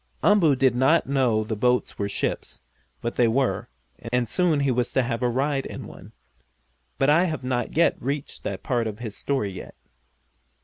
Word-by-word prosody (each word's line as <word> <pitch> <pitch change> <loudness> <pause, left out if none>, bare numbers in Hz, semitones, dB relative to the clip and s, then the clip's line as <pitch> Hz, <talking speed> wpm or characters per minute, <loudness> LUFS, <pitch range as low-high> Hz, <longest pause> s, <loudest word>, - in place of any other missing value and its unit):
Umboo 175 -9 +5
did 130 -1 +3
not 135 +7 +3
know 125 -6 +1
the 110 +1 -3
boats 125 +3 0
were 100 -1 -1
ships, - - -3 0.4
but 120 - -4
they 120 - +4
were, 130 +3 0 0.4
and 125 -1 +1
soon 165 +1 +1
he 140 -2 +2
was 125 0 0
to 130 - +3
have 120 0 -3
a 125 - +2
ride 135 +3 -1
in - - -8
one. - - -12 0.9
But 135 +2 +3
I 170 +4 +4
have 155 -6 -3
not 125 -2 -1 0.3
reached 140 +2 -4
that 100 0 -5
part 120 -5 0
of 105 -1 -5
his 110 -3 -6
story 130 -8 -2
yet. 95 - -9
125 Hz, 180 wpm, -24 LUFS, 115-140 Hz, 0.9 s, Umboo